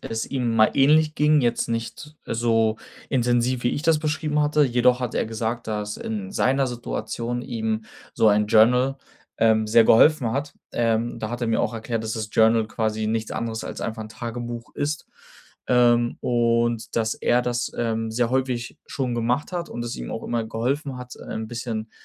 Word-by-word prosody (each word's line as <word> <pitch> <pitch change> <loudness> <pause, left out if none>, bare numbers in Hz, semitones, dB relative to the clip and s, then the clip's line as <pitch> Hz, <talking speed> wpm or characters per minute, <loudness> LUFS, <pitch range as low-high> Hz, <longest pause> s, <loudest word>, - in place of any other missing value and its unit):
es 115 0 -4
ihm 120 -4 -1
mal 110 0 +5
ähnlich 155 +3 +4
ging, 150 0 +4
jetzt 120 -2 0
nicht 115 +6 -5
so 115 -1 +1 0.3
intensiv, 120 0 +1
wie 120 - +2
ich 145 - -3
das 160 -2 +3
beschrieben 155 -1 -1
hatte. 150 0 +3
Jedoch 125 0 +3
hat 125 -3 -3
er - - 0
gesagt, 115 +1 -3
dass 105 -1 -3
in 100 -4 -5
seiner 135 +1 +2
Situation 120 0 -4
ihm 110 -2 -3 0.3
so 110 - +3
ein 105 0 +4
Journal, 125 +5 +4 0.4
ähm, 110 -1 +3
sehr 115 +1 +6
geholfen 120 0 +5
hat. 145 +2 -3 0.2
Ähm, 115 0 0
da 110 - -3
hat 120 +1 -4
er 120 - 0
mir 115 - +1
auch - - -1
erklärt, 115 0 -3
dass 110 0 -3
das 110 -1 -4
Journal 110 0 +4
quasi 110 -1 -2
nichts 110 0 -2
anderes 115 -1 -3
als - - -6
einfach 110 0 -4
'n 110 - -9
Tagebuch 120 +1 -6
ist, 150 +2 -3 0.6
ähm, 120 -1 +3
und 120 -1 0
dass 110 -1 +1
er 120 - +2
das, 120 0 -2
ähm, 115 -1 -1
sehr 120 +1 0
häufig 125 -2 -2
schon 130 -3 -2
gemacht 120 +8 -1
hat 175 -1 -3
und 120 - -5
es 120 - -4
ihm - - -6
auch - - -5
immer 120 -1 -1
geholfen 130 +5 -2
hat, 125 0 -9
äh, - - -15
'n 110 0 -4
bisschen 115 -2 -5
120 Hz, 190 wpm, -24 LUFS, 110-125 Hz, 0.6 s, sehr